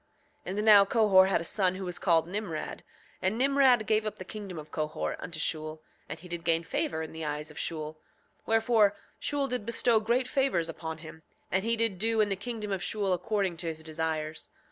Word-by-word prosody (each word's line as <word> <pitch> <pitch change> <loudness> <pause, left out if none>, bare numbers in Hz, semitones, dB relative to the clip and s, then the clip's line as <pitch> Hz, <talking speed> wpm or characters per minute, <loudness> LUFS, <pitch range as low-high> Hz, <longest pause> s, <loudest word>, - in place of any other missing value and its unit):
7:22 190 +2 -3
And 210 - 0
now 210 -2 +9
Cohor 195 -3 +5
had 190 - +1
a - - -4
son 185 +1 +1
who 190 0 -5
was 180 -1 -3
called 165 -3 +3
Nimrod; 185 -4 -4 0.4
and 190 +4 0
Nimrod 265 -3 +4
gave 215 0 +2
up 215 - -4
the 185 - -9
kingdom 200 -3 -7
of 155 -1 -9
Cohor 155 -1 -2
unto 165 -2 -6
Shule, 155 0 -2 0.3
and 160 - -6
he 180 - -12
did 170 -1 -5
gain 165 0 +2
favor 160 -1 -2
in 160 - -7
the 160 0 -6
eyes 150 0 -4
of 150 - -9
Shule; 155 -1 -4 0.5
wherefore 225 -2 +4 0.2
Shule 285 -2 -1
did 250 -4 -3
bestow 230 +1 +2
great 240 +4 +1
favors 255 - +1
upon 160 -1 -5
him, 160 0 -11 0.3
and 190 +1 +1
he 230 +1 +2
did 225 -5 +1
do 225 +2 +1
in 210 -1 +3
the 195 - +1
kingdom 210 +1 -5
of 190 -2 -1
Shule 200 -1 0
according 190 -1 -1
to 165 - -4
his 160 -1 -4
desires. 155 -1 -3
190 Hz, 210 wpm, -29 LUFS, 160-220 Hz, 0.5 s, now